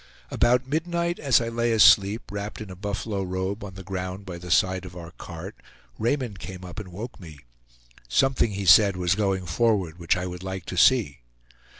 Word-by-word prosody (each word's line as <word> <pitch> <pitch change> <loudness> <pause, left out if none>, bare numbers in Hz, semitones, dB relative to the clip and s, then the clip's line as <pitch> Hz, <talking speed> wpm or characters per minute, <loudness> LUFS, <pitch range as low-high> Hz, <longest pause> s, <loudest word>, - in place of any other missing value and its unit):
About 125 +2 +2
midnight, 170 +4 -1
as 135 -6 +4
I 115 -1 -3
lay 115 0 0
asleep, 105 -1 +5
wrapped 100 +1 -5
in 105 -3 -8
a - - -8
buffalo 100 +1 -3
robe 95 +2 -3
on 95 -2 -8
the 95 - -9
ground 95 +1 -5
by 90 -2 -7
the 90 0 -9
side 95 +1 +2
of 90 -1 -10
our 85 -1 -9
cart, - - -9 0.4
Raymond 120 -4 -1
came 90 0 -8
up 90 +5 -8
and 105 - -8
woke 110 +7 -8
me. 80 -5 -11 0.7
Something 125 - +2
he 100 0 -4
said, 95 +2 +6
was 90 -1 +1
going 95 -2 -1
forward 90 -2 0
which 85 +1 +1
I 90 - -3
would 90 -1 -6
like 95 -1 -6
to - - -6
see. 90 - +3
95 Hz, 195 wpm, -25 LUFS, 90-115 Hz, 0.7 s, said